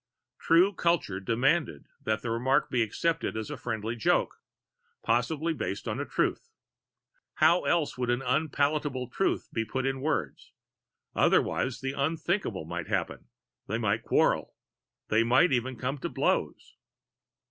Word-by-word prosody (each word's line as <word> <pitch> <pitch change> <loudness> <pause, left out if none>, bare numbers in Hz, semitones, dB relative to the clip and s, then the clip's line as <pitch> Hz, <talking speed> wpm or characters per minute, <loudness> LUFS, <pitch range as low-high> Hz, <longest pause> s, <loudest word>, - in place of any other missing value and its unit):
True 180 +5 +4
culture 170 - 0
demanded 120 - 0 0.2
that 110 0 -1
that 120 - -3
remark 125 +4 +1
be 125 - +2
accepted 115 +4 -1
as 110 -1 -4
a - - -3
friendly 115 -1 -3
joke, 115 - +1 0.7
probably 145 +8 +1
based 100 -9 -4
on - - -2
a - - -2
truth - - -1 0.9
how 165 +3 +4
else 165 -4 +1
could 125 -1 -3
an 120 +2 0
unpalatable 140 -1 0
truth 195 - -1
be 115 - 0
put 130 +4 -3
in 135 0 -1
words? 155 +2 -3 0.6
Otherwise 125 -1 +2
the 135 0 -2
unthinkable 155 - -1
might 85 0 -5
happen. - - -3 0.4
They 110 - -1
might 110 -1 0
quarrel. - - +1 0.5
They 110 +2 +4
might 125 +10 +4
even 130 0 0
come 130 +4 -3
to - - -3
blows! - - -1
130 Hz, 140 wpm, -28 LUFS, 115-155 Hz, 0.9 s, True